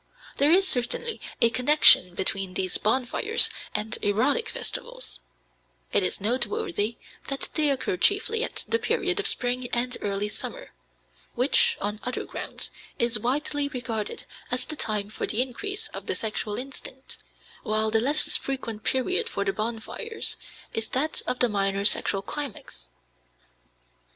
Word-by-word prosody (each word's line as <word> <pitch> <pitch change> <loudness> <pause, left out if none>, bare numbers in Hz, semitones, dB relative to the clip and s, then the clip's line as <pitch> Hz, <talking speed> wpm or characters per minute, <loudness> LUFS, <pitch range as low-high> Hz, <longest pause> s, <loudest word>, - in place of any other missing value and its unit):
There 285 +2 +4
is 380 +2 +5
certainly 320 - 0 0.2
a 230 - +5
connection 250 - +6
between 190 0 -1
these 185 -1 +1
bonfires 260 - +2 0.2
and 215 +1 -2
erotic 255 - +1
festivals; - - -6 0.7
it - - +4
is 90 - 0
noteworthy 250 - -1 0.3
that 275 0 -2
they 305 -2 +2
occur 265 -9 -1
chiefly 425 - +2
at - - -4
the 460 - +2
period - - 0
of 410 - +1
spring 245 - +2
and 245 +1 0
early 200 0 -1
summer, 210 - -6 0.6
which, 255 +4 +4
on 210 +1 -3
other 250 - -3
grounds, - - -6 0.3
is 235 -2 +2
widely 285 +4 0
regarded 235 -6 -4 0.3
as 245 0 +1
the 310 - -3
time 210 -6 -2
for - - -3
the 220 - 0
increase 390 - -2
of - - -8
the - - +1
sexual 215 -1 -2
instinct, 265 0 -6 0.4
while 215 0 0
the 220 0 +3
less 290 +5 +2
frequent 230 -5 -4
period 370 - 0
for 200 - -2
the 195 - 0
bonfires 230 - -3 0.4
is 225 0 -1
that 300 +5 0
of 250 - 0
the 245 - +4
minor 200 -2 0
sexual 195 -2 +4
climax. 260 - -6
245 Hz, 145 wpm, -26 LUFS, 210-295 Hz, 0.7 s, connection